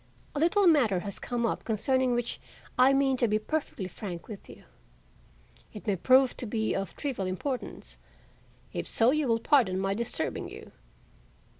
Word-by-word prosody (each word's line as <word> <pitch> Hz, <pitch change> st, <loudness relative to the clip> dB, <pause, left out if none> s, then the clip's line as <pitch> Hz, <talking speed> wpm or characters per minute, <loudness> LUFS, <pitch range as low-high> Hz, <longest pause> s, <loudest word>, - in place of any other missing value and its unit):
"A 290 Hz, -, -2 dB
little 345 Hz, +6 st, +3 dB
matter 245 Hz, -, +4 dB
has 200 Hz, -1 st, -6 dB
come 240 Hz, -1 st, -2 dB
up -, -, -1 dB
concerning 250 Hz, +3 st, +1 dB
which 240 Hz, -1 st, -2 dB, 0.3 s
I 255 Hz, +1 st, +6 dB
mean 270 Hz, -1 st, +2 dB
to 240 Hz, -, +2 dB
be 215 Hz, 0 st, +2 dB
perfectly 215 Hz, -5 st, -3 dB
frank 180 Hz, -2 st, -7 dB
with 210 Hz, -3 st, -9 dB
you. -, -, -13 dB, 1.1 s
It 210 Hz, -, -9 dB
may 205 Hz, -3 st, +1 dB
prove 260 Hz, +7 st, +4 dB
to 245 Hz, -, -4 dB
be 220 Hz, 0 st, -1 dB
of 195 Hz, 0 st, -3 dB
trivial 255 Hz, -10 st, -3 dB
importance; 250 Hz, +8 st, -4 dB, 0.7 s
if -, -, -3 dB
so, 230 Hz, +2 st, +3 dB
you 305 Hz, -1 st, +1 dB
will 230 Hz, -1 st, +2 dB
pardon 230 Hz, -8 st, +3 dB
my 195 Hz, +1 st, 0 dB
disturbing 235 Hz, +3 st, -2 dB
you. -, -, -11 dB
235 Hz, 165 wpm, -29 LUFS, 205-270 Hz, 1.1 s, I